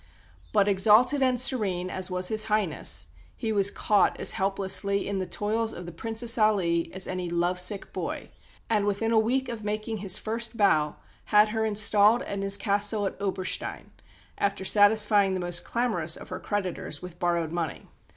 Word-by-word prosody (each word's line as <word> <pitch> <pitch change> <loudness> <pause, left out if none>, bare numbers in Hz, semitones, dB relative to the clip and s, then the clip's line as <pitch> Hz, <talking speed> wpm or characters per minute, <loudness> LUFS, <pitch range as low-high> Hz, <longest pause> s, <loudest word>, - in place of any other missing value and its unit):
But 195 - +3
exalted 215 +8 +4
and 255 -2 +2
serene 195 -8 -1
as 185 0 -3
was 180 0 0
His 215 -1 +1
Highness, 205 - 0 0.3
he 225 - -3
was 200 -2 +3
caught 205 -1 +1
as - - +2
helplessly 195 +1 +1
in 200 -1 -2
the 185 - -3
toils 220 +4 -2
of 180 - -8
the 175 - -7
Princess 225 +6 -1
Aly 185 -6 +1
as 190 0 -3
any 180 -1 -3
lovesick 180 +3 -1
boy; - - -5 0.4
and 210 -3 +1
within 205 +3 -1
a 225 - +4
week 255 +4 0
of 230 -3 -6
making 215 +2 -3
his 195 -1 -1
first 230 +1 -3
bow 155 -8 +2 0.3
had 210 0 +4
her 220 0 -1
installed 210 +1 +3
in 200 -1 -4
his 195 0 +1
Castle 205 +1 +1
of 195 - -3
Oberstein, 190 -2 -4 0.5
after 200 -1 -1
satisfying 205 -1 +4
the - - -2
most 175 -1 -2
clamorous 215 -10 0
of - - -11
her 185 - -5
creditors 185 -7 -4
with 180 -1 -10
borrowed 170 -2 0
money. 170 -2 -4
200 Hz, 170 wpm, -26 LUFS, 185-220 Hz, 0.5 s, exalted